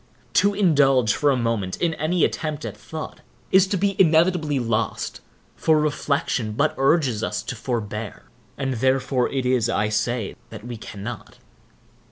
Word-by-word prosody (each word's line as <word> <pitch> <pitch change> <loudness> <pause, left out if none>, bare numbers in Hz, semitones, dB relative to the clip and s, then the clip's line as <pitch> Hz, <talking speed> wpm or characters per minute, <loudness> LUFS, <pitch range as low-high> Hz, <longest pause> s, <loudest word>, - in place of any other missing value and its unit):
To 200 0 +3
indulge, 140 - +4
for 145 - +2
a 135 - +3
moment, 115 -6 -1
in 170 -2 0
any 160 +3 0
attempt 155 -1 -3
at - - -5
thought, 160 -1 -8 0.3
is 190 0 +5
to 195 - -1
be 195 +1 0
inevitably 160 -3 +3
lost; 115 -3 -2 0.3
for 155 -1 +3
reflection 140 -6 -1
but 145 +8 +1
urges 135 -5 +2
us - - -2
to 130 - -5
forbear, 110 -3 -4 0.3
and 135 -1 -1
therefore 130 +1 +1
it 135 -2 -2
is, 125 -3 +2
I 105 +1 +1
say, 115 0 -1
that 110 - -10
we 120 -1 -5
cannot. 105 +2 -8
135 Hz, 155 wpm, -23 LUFS, 115-155 Hz, 0.3 s, is